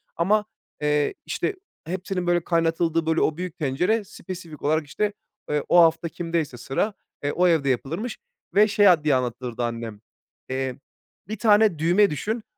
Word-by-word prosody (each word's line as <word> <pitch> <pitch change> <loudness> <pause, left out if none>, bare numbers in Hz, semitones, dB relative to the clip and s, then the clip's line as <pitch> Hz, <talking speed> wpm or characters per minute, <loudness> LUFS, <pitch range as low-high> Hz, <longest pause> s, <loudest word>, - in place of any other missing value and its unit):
Ama, 210 +5 +2 0.4
eee, 150 -1 +1
işte, 415 - -2 0.3
hepsinin, 185 +1 -3
böyle, 175 -1 +2
kaynatıldığı, 165 -1 +1
böyle, 160 0 +1
o 155 - +1
büyük 180 -1 -5
tencere 180 +9 +1
spesifik 180 -5 -9
olarak, 155 +1 +1
işte, 210 +7 -1 0.4
eee, 150 -1 0
o 175 - +7
hafta 165 0 +3
kimdeyse 165 -6 -3
sıra, 135 - -1 0.3
eee, 145 - 0
o 180 +1 +3
evde 160 -5 +2
yapılırmış. 165 - -2 0.4
Ve 210 +2 +6
şey 205 0 +4
a 170 -5 +5
diye 150 -3 +3
anlatırdı 125 -1 -3
annem, 115 -3 -4 0.5
eee, 130 -1 -2 0.5
1 215 +2 -4
tane 210 -5 +4
düğme 180 +6 +4
düşün, 215 - -3
165 Hz, 155 wpm, -24 LUFS, 145-190 Hz, 0.5 s, o